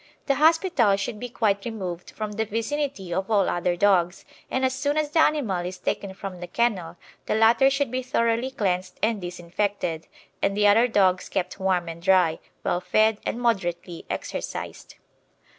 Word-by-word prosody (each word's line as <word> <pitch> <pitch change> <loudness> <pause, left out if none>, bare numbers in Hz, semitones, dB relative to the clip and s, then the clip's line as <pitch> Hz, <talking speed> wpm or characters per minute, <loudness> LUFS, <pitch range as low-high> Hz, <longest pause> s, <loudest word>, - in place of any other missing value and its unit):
The 275 - +2
hospital 310 - +3
should 200 +2 -4
be 245 - -5
quite 205 -4 0
removed 185 -7 -5
from 215 -1 -5
the 220 +1 -2
vicinity 230 -3 -3
of 190 +3 -2
all 205 -3 +3
other 175 0 0
dogs, 180 -2 +2 0.2
and 260 0 0
as 260 - +1
soon 285 +3 -1
as 300 -1 0
the 320 - +2
animal 250 - +2
is 180 +1 -5
taken 190 +1 -3
from 195 -2 -7
the 175 - -6
kennel 180 -5 -1 0.3
the - - +1
latter 230 +4 +5
should 275 -2 -1
be 255 0 -1
thoroughly 235 0 0
cleansed 190 -8 -2
and 220 -2 +1
disinfected, 175 -1 -3 0.3
and 200 +1 0
the 210 - +3
other 220 +4 +6
dogs 190 -5 +2
kept 190 +1 -3
warm 185 -2 +1
and 165 0 -7
dry, 180 -3 +3 0.2
well 175 - 0
fed, 215 +2 +2
and 235 - -2
moderately 175 -7 -2
exercised. - - -5
205 Hz, 175 wpm, -25 LUFS, 180-240 Hz, 0.3 s, other